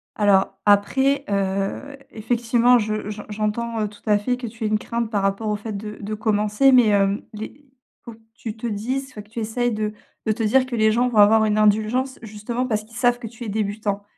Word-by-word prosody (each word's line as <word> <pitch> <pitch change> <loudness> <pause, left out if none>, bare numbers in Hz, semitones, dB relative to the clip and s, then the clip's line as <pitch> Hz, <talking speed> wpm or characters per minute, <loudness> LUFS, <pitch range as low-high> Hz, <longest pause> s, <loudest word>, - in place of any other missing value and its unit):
Alors 195 -2 +2
après, 265 +8 +3
heu, 195 +7 -2 0.2
effectivement, 235 +2 +2
je 215 -1 -3
j'en 210 0 -6
j'entends, 215 +2 -2
heu, 210 - 0
tout 205 0 -15
à 210 -2 +4
fait 245 +5 -1
que 250 - -6
tu 225 0 -6
aies - - +2
une 215 0 +2
crainte 235 0 -3
par 205 -3 0
rapport 195 +3 -1
au 210 - 0
fait 210 +2 -6
de 210 +1 -7
de 210 +1 -5
commencer, 215 +4 +2
mais, 245 -3 +6
hem, 200 0 +2
les 220 +7 -9 0.4
faut 235 - -9
que 220 - -19 0.2
tu 225 -2 -7
te 235 - -4
dises 245 +6 -3
enfin, 215 - -8
que 205 - -19
tu 230 - -6
essayes 240 +2 -1
de 215 -1 -2 0.3
de 220 - +2
te 225 +1 -3
dire 255 +5 +3
que 255 -2 -5
les 220 -1 +3
gens 240 +3 +2
vont 240 -3 -2
avoir 220 +1 +6
une 210 0 +1
indulgence, 215 +5 +1
justement, 225 +3 -4
parce 215 -3 -1
qu'ils 225 +1 -14
savent 245 -1 +3
que 245 - -8
tu 235 +2 -10
es - - -4
débutant. 205 -1 -2
215 Hz, 230 wpm, -22 LUFS, 210-235 Hz, 0.4 s, mais